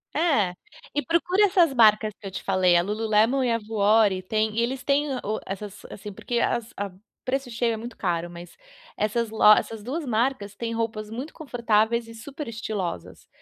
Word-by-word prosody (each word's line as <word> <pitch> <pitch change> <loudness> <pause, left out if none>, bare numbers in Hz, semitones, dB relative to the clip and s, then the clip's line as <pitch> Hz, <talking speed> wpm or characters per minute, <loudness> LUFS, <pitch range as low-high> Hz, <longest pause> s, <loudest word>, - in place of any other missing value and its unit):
É, 275 - +2 0.4
e 295 - +2
procura 355 +4 +2
essas 355 -6 +3
marcas 215 -3 +5
que - - -14
eu - - -7
te - - -5
falei, 185 -2 +3
a 170 - +5
Lululemon 220 +6 +2
e 245 - +1
a 230 - +1
Gowri 210 -2 +2
tem, 215 +2 0
e - - +3
eles 255 +3 -2
têm 290 +1 +1
o 215 +1 -2
essas, 200 +1 -7
assim, 210 +1 -8
porque 235 +4 -2
as 230 -1 -1
a 205 - -2
o 195 +6 -23
preço 265 -1 -1
cheio 230 0 0
é - - -3
muito 235 +2 -8
caro 175 -2 -1
mas, 175 0 -11 0.4
essas 220 +2 0 0.3
essas 225 -2 -3
2 295 +7 -4
marcas 225 -3 -1
têm 230 +2 -4
roupas 220 -2 -3
muito 255 +8 -6
confortáveis 235 -4 0
e 230 - -11
super 280 +6 -8
estilosas. 195 - -5
225 Hz, 190 wpm, -25 LUFS, 205-245 Hz, 0.4 s, marcas